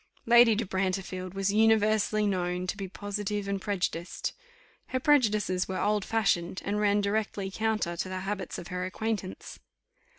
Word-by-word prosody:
Lady 235 Hz, -1 st, +7 dB
de 225 Hz, +2 st, -1 dB
Brantefield 185 Hz, -1 st, -2 dB
was 195 Hz, +1 st, 0 dB
universally 215 Hz, -1 st, +3 dB
known 180 Hz, -2 st, -1 dB
to 185 Hz, -, -2 dB
be 200 Hz, -1 st, -5 dB
positive 205 Hz, +1 st, -3 dB
and 200 Hz, -1 st, -2 dB
prejudiced. 180 Hz, -3 st, -2 dB, 0.5 s
Her 255 Hz, -, -1 dB
prejudices 215 Hz, -10 st, +2 dB
were 190 Hz, -, -3 dB
all 210 Hz, -, +2 dB
old 210 Hz, -2 st, -1 dB
fashioned, 185 Hz, -5 st, +1 dB
and 205 Hz, +1 st, 0 dB
ran 205 Hz, 0 st, +3 dB
directly 200 Hz, -1 st, -1 dB
counter 215 Hz, -4 st, -1 dB
to 185 Hz, -, -3 dB
the 185 Hz, 0 st, -4 dB
habits 195 Hz, -1 st, -4 dB
of 175 Hz, -, -8 dB
her 180 Hz, 0 st, -3 dB
acquaintance. 195 Hz, 0 st, -4 dB
200 Hz, 160 wpm, -29 LUFS, 185-215 Hz, 0.5 s, Lady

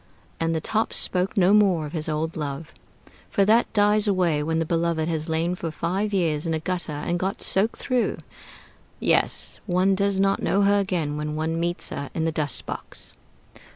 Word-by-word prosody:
And 165 Hz, 0 st, 0 dB
the -, -, 0 dB
Top 220 Hz, +7 st, -1 dB
spoke 185 Hz, +3 st, 0 dB
no 190 Hz, +1 st, +5 dB
more 190 Hz, -7 st, +3 dB
of 150 Hz, -, -7 dB
his 160 Hz, -2 st, -2 dB
old 160 Hz, +1 st, -2 dB
love: 150 Hz, 0 st, -5 dB, 0.6 s
for 200 Hz, -, +2 dB
that 225 Hz, +3 st, +3 dB
dies 210 Hz, 0 st, +5 dB
away 180 Hz, -6 st, +1 dB
when 160 Hz, +2 st, -1 dB
the 165 Hz, -, 0 dB
beloved 165 Hz, -1 st, 0 dB
has 160 Hz, -1 st, -2 dB
lain 165 Hz, +2 st, 0 dB
for 170 Hz, -2 st, -4 dB
five 185 Hz, +6 st, -2 dB
years 165 Hz, -5 st, 0 dB
in 165 Hz, -, 0 dB
a -, -, -2 dB
gutter 175 Hz, 0 st, -3 dB
and 150 Hz, +4 st, -2 dB
got 190 Hz, +2 st, -3 dB
soaked 205 Hz, +4 st, +1 dB
through; 250 Hz, -2 st, -1 dB, 0.8 s
yes, -, -, +2 dB
one 185 Hz, +1 st, +2 dB
does 200 Hz, 0 st, 0 dB
not 195 Hz, 0 st, +2 dB
know 200 Hz, +1 st, +2 dB
her 200 Hz, 0 st, +4 dB
again 170 Hz, -7 st, -1 dB
when 150 Hz, 0 st, -3 dB
one 160 Hz, +1 st, -2 dB
meets 175 Hz, +1 st, -2 dB
her 140 Hz, -1 st, -5 dB
in 160 Hz, -, -1 dB
the 165 Hz, -, 0 dB
dust 150 Hz, -2 st, -1 dB
box. -, -, -7 dB
170 Hz, 190 wpm, -24 LUFS, 160-195 Hz, 0.8 s, no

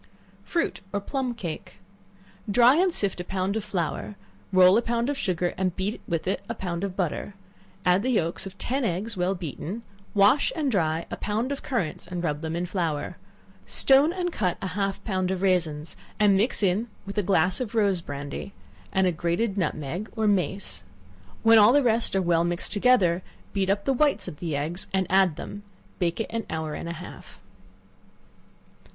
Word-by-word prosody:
Fruit 335 Hz, -1 st, -1 dB
or 205 Hz, -, 0 dB
Plum 255 Hz, +3 st, -2 dB
Cake. 170 Hz, -8 st, -6 dB, 0.7 s
Dry 240 Hz, +4 st, +6 dB
and 370 Hz, +1 st, +3 dB
sift 200 Hz, -, -1 dB
a -, -, -2 dB
pound 190 Hz, +2 st, -2 dB
of 220 Hz, -, -1 dB
flour, 170 Hz, -, -3 dB, 0.4 s
roll 185 Hz, 0 st, +7 dB
a 230 Hz, -, +4 dB
pound 235 Hz, +3 st, 0 dB
of 285 Hz, -, -4 dB
sugar, 180 Hz, -4 st, 0 dB
and 185 Hz, -2 st, 0 dB
beat 195 Hz, +3 st, -1 dB
it -, -, -12 dB
with 165 Hz, 0 st, -2 dB
a 190 Hz, -, 0 dB, 0.2 s
pound 175 Hz, -3 st, -4 dB
of 195 Hz, -2 st, -3 dB
butter, 190 Hz, +2 st, -2 dB, 0.5 s
and 180 Hz, +1 st, +4 dB
the 260 Hz, -, 0 dB
yelks 190 Hz, -5 st, 0 dB
of 190 Hz, 0 st, -11 dB
ten 265 Hz, +7 st, -1 dB
eggs 210 Hz, +2 st, 0 dB
well 185 Hz, +1 st, 0 dB
beaten; 180 Hz, -, -6 dB, 0.3 s
wash 205 Hz, +8 st, +5 dB
and 295 Hz, -4 st, 0 dB
dry 165 Hz, -5 st, +1 dB
a -, -, -3 dB
pound 220 Hz, +6 st, -1 dB
of 280 Hz, -, -3 dB
currants 180 Hz, -, -2 dB
and 175 Hz, -1 st, -4 dB
rub 150 Hz, -3 st, -1 dB
them 160 Hz, 0 st, -3 dB
in 175 Hz, +1 st, -1 dB
flour; 170 Hz, -3 st, -2 dB, 0.5 s
stone 275 Hz, +4 st, +4 dB
and 355 Hz, -1 st, -2 dB
cut 180 Hz, -4 st, 0 dB
half 195 Hz, +1 st, -1 dB
a -, -, -26 dB
pound 185 Hz, -3 st, -1 dB
of 190 Hz, 0 st, -2 dB
raisins, 165 Hz, -5 st, +1 dB, 0.2 s
and 205 Hz, -2 st, +5 dB
mix 215 Hz, +2 st, +2 dB
in 200 Hz, +5 st, +2 dB, 0.2 s
with 200 Hz, +1 st, -3 dB
a -, -, +4 dB
glass 185 Hz, -2 st, +2 dB
of 235 Hz, -2 st, -4 dB
rose 200 Hz, -5 st, +3 dB
brandy, 145 Hz, +6 st, -6 dB, 0.4 s
and 190 Hz, -1 st, +2 dB
a 180 Hz, -, +3 dB
grated 175 Hz, +6 st, -1 dB
nutmeg, 175 Hz, +1 st, -2 dB
or 220 Hz, -1 st, 0 dB
mace; 195 Hz, -1 st, 0 dB, 0.6 s
when 225 Hz, 0 st, +8 dB
all 210 Hz, +2 st, +8 dB
the 290 Hz, 0 st, +5 dB
rest 230 Hz, -3 st, +2 dB
are 190 Hz, -, +2 dB
well 170 Hz, -1 st, +3 dB
mixed 175 Hz, 0 st, -1 dB
together, 205 Hz, -6 st, +4 dB, 0.3 s
beat 195 Hz, -2 st, 0 dB
up 200 Hz, +1 st, +1 dB
the 270 Hz, -, +3 dB
whites 290 Hz, +3 st, +2 dB
of 150 Hz, -, -7 dB
the 165 Hz, -4 st, -2 dB
eggs, 160 Hz, +6 st, -3 dB
and 190 Hz, -1 st, +2 dB
add 190 Hz, -4 st, +4 dB
them; 205 Hz, +5 st, -7 dB, 0.4 s
bake 170 Hz, -2 st, 0 dB
it 225 Hz, -, -1 dB
an 230 Hz, 0 st, -2 dB
hour 160 Hz, -1 st, -3 dB
and 170 Hz, -, -5 dB
a -, -, -3 dB
half. 170 Hz, +2 st, -11 dB
190 Hz, 190 wpm, -26 LUFS, 175-220 Hz, 0.7 s, when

